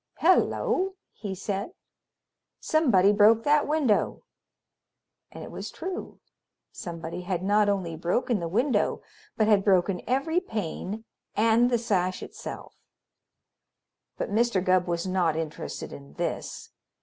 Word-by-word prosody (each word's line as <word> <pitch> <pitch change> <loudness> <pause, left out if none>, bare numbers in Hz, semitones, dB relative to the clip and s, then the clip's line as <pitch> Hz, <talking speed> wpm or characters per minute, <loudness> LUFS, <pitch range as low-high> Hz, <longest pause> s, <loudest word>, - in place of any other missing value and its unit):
"Hello!" 380 +2 +2 0.2
he 205 -2 -6
said. 200 - -4 0.9
"Somebody 225 - +4
broke 220 +2 +5
that 295 0 +3
window!" 290 -8 +1 1.1
And - - -9
it - - -9
was - - -6
true. 365 +3 -6 0.5
Somebody 170 0 -6
had 180 -1 -3
not 205 +1 +3
only 185 -5 -1
broken 195 +7 0
the 170 - -3
window, 240 - +1 0.3
but 215 - +3
had 205 -3 +4
broken 185 -2 +2
every 275 +7 +1
pane 215 - -5 0.3
and 230 +3 +4
the 240 - +2
sash 185 -5 0
itself. - - -8 1.4
But - - -3
Mr. 215 -3 +2
Gubb 185 -1 +3
was 170 0 -1
not 180 -4 +1
interested 160 - -5
in 70 0 -11
this. - - -4
205 Hz, 125 wpm, -27 LUFS, 180-240 Hz, 1.4 s, broke